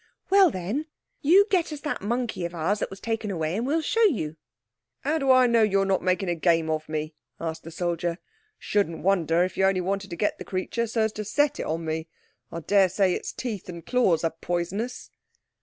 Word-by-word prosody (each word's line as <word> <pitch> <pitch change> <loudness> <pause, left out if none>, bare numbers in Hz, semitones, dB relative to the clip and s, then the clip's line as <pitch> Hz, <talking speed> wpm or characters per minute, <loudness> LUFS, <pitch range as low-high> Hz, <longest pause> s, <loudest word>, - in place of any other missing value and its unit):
"Well 390 -2 +7
then, 215 - -3 0.3
you 370 +8 +6
get 355 -4 +2
us 295 -1 -6
that 295 - -3
monkey 235 -1 -2
of 170 0 -4
ours 185 +6 0
that - - -2
was 195 - -10
taken 225 -1 -2
away, 165 -3 -2
and 235 +4 -1
we'll 315 +3 +1
show 455 +8 +1
you." 210 - +2 0.7
"How 310 +3 0
do 275 -2 0
I 255 -1 +6
know 235 -1 +4
you're 195 -2 +3
not 195 -1 +1
making 180 -2 0
game 165 -2 +2
of 155 0 -3
me?" 155 0 -3 0.3
asked 160 -1 -4
the 165 - -9
soldier. 170 0 -2 0.4
"Shouldn't 200 -6 -1
wonder 175 -3 +3
if 185 - -3
you 190 - +2
only 195 -1 +2
wanted 195 +2 -2
to 170 - -5
get 205 - -1
the - - -5
creature 200 +5 -2
so 225 0 -1
as 220 0 +2
to 215 - -5
set 290 +7 +1
it - - -3
on 165 +1 -2
me. 160 +1 -3 0.4
I 170 - -5
daresay 190 0 +3
its - - -4
teeth 215 -8 -5
and 170 -2 -8
claws 190 -11 +2
are 165 - 0
poisonous." 185 +8 -3
195 Hz, 210 wpm, -26 LUFS, 170-240 Hz, 0.7 s, Well